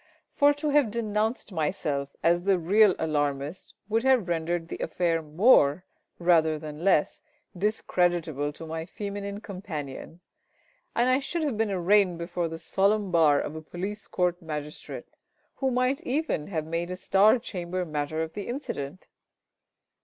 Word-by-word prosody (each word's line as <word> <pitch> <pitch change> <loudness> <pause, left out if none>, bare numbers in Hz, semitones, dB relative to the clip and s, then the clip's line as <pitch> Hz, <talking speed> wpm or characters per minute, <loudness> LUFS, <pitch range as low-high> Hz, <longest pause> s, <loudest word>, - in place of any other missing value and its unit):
For 285 0 +5
to 295 +1 -2
have 290 -5 +4
denounced 215 0 -1
myself 150 -4 -2
as 170 +1 +3
the 195 +1 +3
real 195 +3 +4
alarmist 145 +1 -2
would 225 +2 +1
have 255 -6 +3
rendered 170 0 -1
the - - -6
affair 165 0 0
more, 155 - +4 0.3
rather 165 -3 +3
than 150 +1 -8
less, 185 -6 +2 0.3
discreditable 175 -7 0
to 165 - -9
my 160 +1 -5
feminine 200 +1 -5
companion, 170 -6 -7 0.7
and 240 +1 +3
I 255 +1 +4
should 310 +4 -3
have 285 -6 -1
been 220 0 0
arraigned 190 -1 +3
before 170 0 -2
the 165 0 -6
solemn 200 +3 +1
bar 155 -4 +5
of 155 - -4
a 160 - -6
police 195 +6 -6
court 180 0 0
magistrate, 150 -2 -6 0.5
who 270 - +1
might 255 +2 +1
even 270 - -1
have 160 -5 -3
made 165 +2 -3
a 180 - -3
Star 195 +5 +4
Chamber 180 -4 -4
matter 155 0 -2
of 160 0 -7
the 205 - -6
incident. 185 - -5
180 Hz, 150 wpm, -27 LUFS, 160-210 Hz, 0.7 s, For